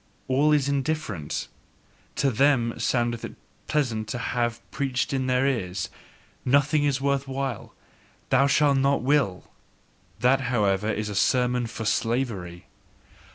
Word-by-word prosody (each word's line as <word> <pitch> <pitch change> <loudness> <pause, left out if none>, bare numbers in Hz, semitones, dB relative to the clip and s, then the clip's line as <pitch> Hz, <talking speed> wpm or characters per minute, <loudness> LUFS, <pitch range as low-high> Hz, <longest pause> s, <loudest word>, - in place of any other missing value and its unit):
All 140 +4 +3
is 145 -3 +3
indifferent!" 140 - -2 0.7
TO 135 - +1
THEM 120 -1 +3
soundeth 120 -2 0
it - - -7 0.3
pleasant 120 -8 0
to 125 - -3
have 120 -1 -1
preached 135 -1 -1
in 130 -1 0
their 125 +1 +2
ears: 95 -9 -1 0.5
"Nothing 145 +3 +3
is 140 -2 +1
worth 140 0 0
while! 135 -4 -4 0.6
Ye 135 +2 +5
shall 145 0 +4
not 135 -1 +2
will!" 130 -9 +1 0.7
That, 135 +2 +3
however, 105 -3 +1
is 105 0 -3
a - - -4
sermon 125 +3 +2
for 110 0 -6
slavery. 105 -6 -1
125 Hz, 130 wpm, -25 LUFS, 115-140 Hz, 0.7 s, Ye